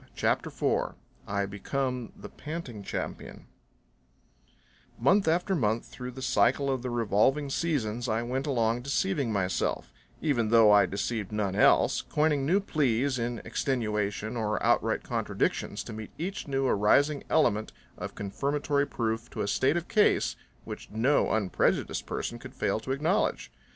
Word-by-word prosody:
CHAPTER - - +1
IV - - -1 0.3
I 100 0 0
Become 125 +5 -3
The - - -9
Panting 150 -9 -7
Champion 100 - -6 1.5
Month 185 - +3
after 175 +4 +2
month, 115 - 0
through 125 0 -8
the 130 +1 -8
cycle 130 +2 +2
of 130 -2 -1
the 125 - -3
revolving 120 +5 +1
seasons, 120 -8 -1
I 110 +1 0
went 130 +4 -2
along 115 -3 +1
deceiving 130 -2 0
myself, 95 -3 -1 0.3
even 120 -8 +1
though 115 -2 +7
I 105 -1 +6
deceived 105 +1 -3
none 105 -3 -1
else, 105 - +4
coining 150 -2 +1
new 185 +5 +4
pleas 140 - 0
in 120 0 -3
extenuation 110 -3 -1
or 110 -2 -1
outright - - +2
contradictions - - -2
to - - -8
meet 110 -1 -7
each 185 +2 -4
new 135 -1 0
arising 140 +7 +3
element 110 -9 +2 0.2
of - - -7
confirmatory 140 +7 -1
proof 115 0 -2
to - - -5
a - - -1
state 130 +9 +2
of 170 - -4
case 210 - +3 0.3
which - - -8
no 120 +7 +2
unprejudiced 105 -4 0
person - - -4
could - - -11
fail - - 0
to 130 - -5
acknowledge. 155 +9 0
120 Hz, 145 wpm, -28 LUFS, 110-140 Hz, 1.5 s, though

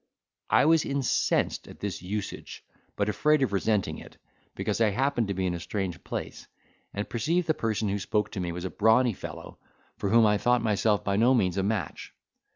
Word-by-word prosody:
I - - +4
was 160 0 +4
incensed 140 -2 0
at - - -12
this 100 -4 -4
usage, 100 +3 -6 0.3
but 100 - 0
afraid 150 +6 +2
of 105 - -1
resenting 100 0 0
it, - - -14 0.4
because - - -2
I 110 - +5
happened 125 +1 0
to 100 - -2
be 95 0 -1
in 90 - 0
a 85 - -4
strange 95 -1 -4
place, - - -6 0.4
and 100 +1 -4
perceived 165 +10 0
the 155 - +2
person 110 -5 -1
who 100 +1 -1
spoke 105 +2 -1
to 100 - -5
me 90 -2 -2
was 90 +2 -5
a 95 - -4
brawny 110 +3 +3
fellow, - - -9 0.4
for 100 - -2
whom 115 +1 +5
I 105 -1 +3
thought 120 -1 +2
myself 105 -1 +1
by 100 0 0
no 120 +4 +4
means 90 -7 +1
a - - +2
match. 100 -5 -3
105 Hz, 200 wpm, -27 LUFS, 100-120 Hz, 0.4 s, I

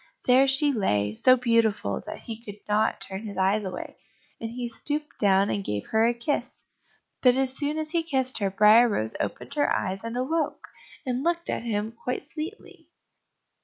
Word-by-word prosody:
There 260 +2 +5
she 275 +2 +4
lay, 105 - 0
so 255 - +5
beautiful 230 -3 +1
that - - -7
he 230 -1 -8
could 205 -2 -9
not 210 +1 +1
turn 190 0 -5
his 200 -2 -7
eyes 195 +3 +2
away; 190 -2 -6 0.4
and 225 - -4
he 245 +1 -5
stooped 295 +6 -4
down 195 -1 +3
and 200 - -2
gave 105 - -3
her 220 +1 +4
a 240 - +2
kiss. 240 +5 -3 0.6
But 250 -1 +5
as 265 0 +1
soon 295 +1 -2
as 310 -1 -3
he 340 -1 +1
kissed 265 -6 -1
her, 200 -2 +1
Briar 215 +4 +6
rose 110 - -1
opened - - -4
her 290 0 +1
eyes 190 +1 -1
and 230 +1 -4
awoke, 300 +4 -2 0.4
and 255 0 -2
looked 340 +1 0
at - - -2
him 220 -2 -2
quite 250 +3 -5
sweetly. 315 +8 -8
235 Hz, 185 wpm, -26 LUFS, 205-275 Hz, 0.6 s, Briar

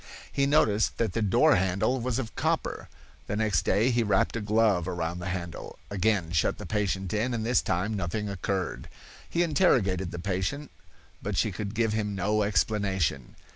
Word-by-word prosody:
He 140 0 +1
noticed 110 -8 +2
that 110 -6 0
the 115 - -1
door 100 -2 +4
handle 95 +8 +1
was 125 -1 -1
of 120 -5 -4
copper. - - -1 0.4
The - - -2
next 105 -7 +1
day 115 +5 +2
he 120 0 +2
wrapped 105 -2 +1
a 115 - -2
glove 105 -4 +2
around 85 -1 -3
the 90 - -5
handle, 85 -3 -6
again 100 -3 +1
shut 85 -3 +1
the - - -7
patient 95 -3 -1
in, 120 +4 0
and 110 -1 -2
this 120 +2 +3
time 95 +5 -1
nothing 105 +2 -2
occurred. 95 -1 -3 0.4
He 170 - +1
interrogated 110 - +2
the 85 - -6
patient, 95 +11 -3 0.5
but - - -3
she - - +2
could 105 +1 -5
give 110 -1 +1
him 105 -2 -1
no 105 +3 +1
explanation. 95 - 0
105 Hz, 175 wpm, -28 LUFS, 95-110 Hz, 0.5 s, door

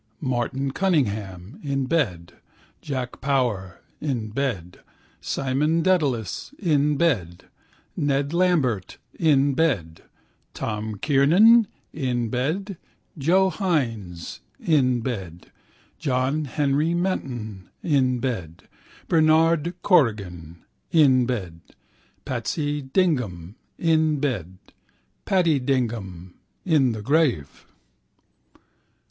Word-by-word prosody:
Martin 130 +1 -2
Cunningham 110 - -1
(in 135 -2 -1
bed), 100 - -1 0.5
Jack 130 -3 -5
Power 120 -9 -1 0.2
(in 125 -7 -2
bed), 110 -9 -3 0.4
Simon 150 +5 0
Dedalus 150 - 0
(in 150 -5 +1
bed), 100 - 0 0.5
Ned 140 +1 0
Lambert 150 - +1 0.2
(in 145 -4 +3
bed), 105 - 0 0.5
Tom 110 0 -4
Kernan 175 - +5 0.3
(in 125 -5 -1
bed), 160 - -2 0.4
Joe 185 +6 +3
Hynes 115 - -2 0.2
(in 130 -6 +2
bed), 95 -9 -6 0.5
John 135 +1 0
Henry 145 +4 0
Menton 120 - -3
(in 130 -5 +2
bed), 105 -11 -4 0.4
Bernard 165 +1 +3
Corrigan 95 - +1 0.3
(in 130 -6 +5
bed), 90 -10 -4 0.6
Patsy 145 -1 -2
Dignam 125 - -1 0.2
(in 160 -3 +2
bed), 100 - -3 0.7
Paddy 170 -6 +2
Dignam 110 -9 -2 0.3
(in 150 -8 +3
the 110 -1 -6
grave). 135 - 0
135 Hz, 85 wpm, -24 LUFS, 110-155 Hz, 0.7 s, Kernan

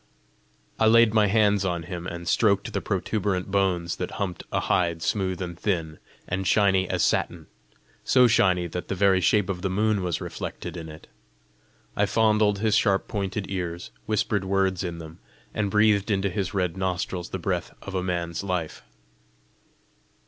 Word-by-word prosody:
I 110 - +4
laid 115 -1 +6
my 105 -2 +4
hands 105 -1 +3
on 90 -3 -2
him, 90 0 -6
and 85 -1 -6
stroked 100 -1 +2
the - - -1
protuberant 95 -3 -2
bones 90 -4 0
that 90 - -4
humped 95 -4 -3
a - - 0
hide 85 -2 0
smooth 95 -3 -1
and 85 -1 -6
thin, 80 -6 -2 0.3
and 95 +1 -2
shiny 95 -3 +3
as - - 0
satin - - -1 0.6
so 125 -1 +5
shiny 90 -6 +3
that 90 +1 -5
the 95 - -2
very 95 -1 +3
shape 105 +1 +3
of 95 -3 -3
the 95 - -1
moon 105 +1 +1
was 90 -3 -2
reflected - - -6
in 80 -2 -7
it; 75 +1 -12 0.9
I 105 - +2
fondled 105 0 +3
his 110 +1 +1
sharp 100 -3 +2
pointed 100 -1 -3
ears, 90 -4 -4 0.2
whispered 105 -2 0
words 95 -1 0
in 85 -2 -4
them, 80 0 -10 0.3
and 105 -2 -1
breathed 105 0 +3
into 100 -1 0
his 95 -1 -2
red 90 -4 -1
nostrils 90 -1 -3
the - - -4
breath 90 -1 -2
of 100 - -7
a 95 - 0
man's 85 -1 -3
life. 90 -5 -3
95 Hz, 170 wpm, -25 LUFS, 90-100 Hz, 0.9 s, laid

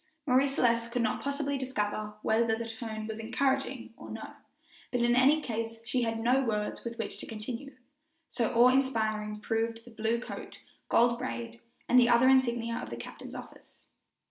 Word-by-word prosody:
Marie 265 0 +4
Celeste 235 -3 +1
could 245 0 0
not 220 - 0
possibly 280 0 -1
discover 210 -5 -2
whether 225 0 +3
the 230 0 -5
tone 225 -1 -5
was 220 0 -5
encouraging 270 +4 -1
or - - -11
no, - - -7 0.6
but 245 - 0
in 240 0 +4
any 280 +5 +5
case 225 -1 -3
she 245 +1 0
had 225 -1 -1
no 250 +4 +3
words 210 -3 -2
with 235 0 -5
which 225 - -4
to - - -4
continue, 235 +5 -6 0.5
so 235 -3 -1
awe 240 +2 +7
inspiring 220 -5 0
proved 225 +1 -2
the 240 - -13
blue 225 +1 0
coat, 245 - -8 0.3
gold 235 0 +4
braid, 235 -2 -5 0.3
and 250 - +6
the 240 -1 +5
other 240 +1 +6
insignia 235 -3 +2
of - - -5
the - - -6
captain's - - -9
office. - - -12
235 Hz, 175 wpm, -30 LUFS, 225-255 Hz, 0.6 s, awe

